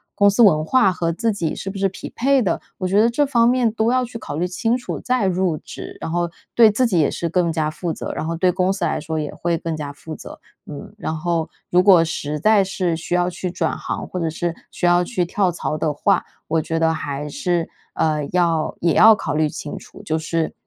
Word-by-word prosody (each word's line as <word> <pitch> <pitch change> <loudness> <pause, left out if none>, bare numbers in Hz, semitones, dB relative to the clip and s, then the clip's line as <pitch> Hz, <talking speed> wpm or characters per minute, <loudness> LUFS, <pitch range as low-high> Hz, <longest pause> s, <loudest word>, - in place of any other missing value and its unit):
公 200 0 +5
司 205 +4 +2
文 155 -9 +6
化 240 +3 +3
和 170 -2 -1
自 225 +6 0
己 170 -6 -2
是 195 - -5
不 195 - -6
是 195 0 +1
匹 190 - -8
配 270 +2 +3
的。 185 -7 0 0.2
我 185 - -2
觉 200 +3 +3
得 230 - +4
这 290 +5 +1
方 235 -3 +3
面 250 -2 +2
都 225 +1 +1
要 255 0 +2
去 240 -1 -8
考 155 - -6
虑 180 - 0
清 225 +7 0
楚， 250 - -5
再 250 -4 0
入 185 -3 +1
职， - - -9
然 - - -5
后 175 +1 -1 0.3
对 225 -2 +7
自 245 +4 +2
己 180 -6 +1
也 150 - +2
是 170 - -3
更 170 0 +1
加 155 -1 0
负 170 +2 -4
责， - - -5
然 - - -4
后 165 +1 -2
对 180 +2 +2
公 185 +1 +1
司 195 -3 -1
来 160 - -1
说 160 +1 -3
也 150 -1 -4
会 170 -1 -1
更 165 0 -4
加 150 -2 -5
负 155 +2 -9
责。 - - -11 0.3
嗯， 145 +6 -9
然 180 - -3
后 165 0 -1 0.2
如 180 +1 +4
果 185 -4 +7
实 150 -2 -3
在 215 +4 +4
是 185 -3 -1
需 165 +2 -5
要 175 0 +2
去 180 0 -4
转 180 - -1
行， - - -4
或 180 - -5
者 165 - 0
是 170 +1 -3 0.2
需 - - -3
要 175 0 +4
去 180 -1 -1
跳 185 +1 +1
槽 155 -2 -3
的 155 -1 -1
话， 145 - +2 0.2
我 160 0 +1
觉 165 +1 -2
得 160 0 +2
还 145 -2 -4
是， 165 +3 -1 0.3
呃， 150 -2 0
要 170 -3 +1
也 170 -2 +2
要 220 0 +8
考 160 -7 -3
虑 155 0 +2
清 145 - -6
楚， - - -12
就 160 - -1
是， 160 0 -2
175 Hz, 265 characters per minute, -21 LUFS, 160-200 Hz, 0.3 s, 要